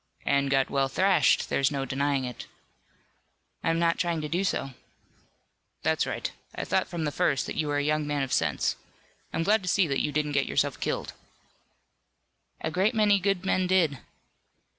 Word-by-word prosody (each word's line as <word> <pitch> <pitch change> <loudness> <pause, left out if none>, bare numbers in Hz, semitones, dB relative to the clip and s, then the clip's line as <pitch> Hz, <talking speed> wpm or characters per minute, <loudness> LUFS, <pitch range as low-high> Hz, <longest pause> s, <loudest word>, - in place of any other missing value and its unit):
"And 140 0 +2
got 135 -1 +2
well 135 -1 +2
thrashed. 180 +1 +3
There's 135 -1 +2
no 140 -2 -2
denying 135 0 0
it." 125 -1 -7 1.2
"I'm 165 0 +1
not 170 0 +1
trying 170 -2 0
to 150 - -3
do 175 +5 -1
so." 135 -7 -1 1.1
"That's - - +1
right. - - -3 0.2
I - - -3
thought - - +1
from 170 -2 -4
the 150 - -1
first 135 - +1
that - - -5
you 155 - -1
were 145 0 0
a 145 - 0
young 150 0 0
man 145 -1 0
of 130 - -3
sense. - - +1 0.5
I'm 165 - -1
glad 210 +3 +3
to 180 - -3
see 195 0 +3
that 140 -4 0
you 150 - -1
didn't 150 0 -1
get 140 -1 +1
yourself - - 0
killed." - - -3 1.5
"A 160 - -2
great 195 +8 +1
many 205 -2 +4
good 195 -1 0
men 185 -1 +1
did." 170 -8 +2
150 Hz, 185 wpm, -27 LUFS, 140-180 Hz, 1.5 s, many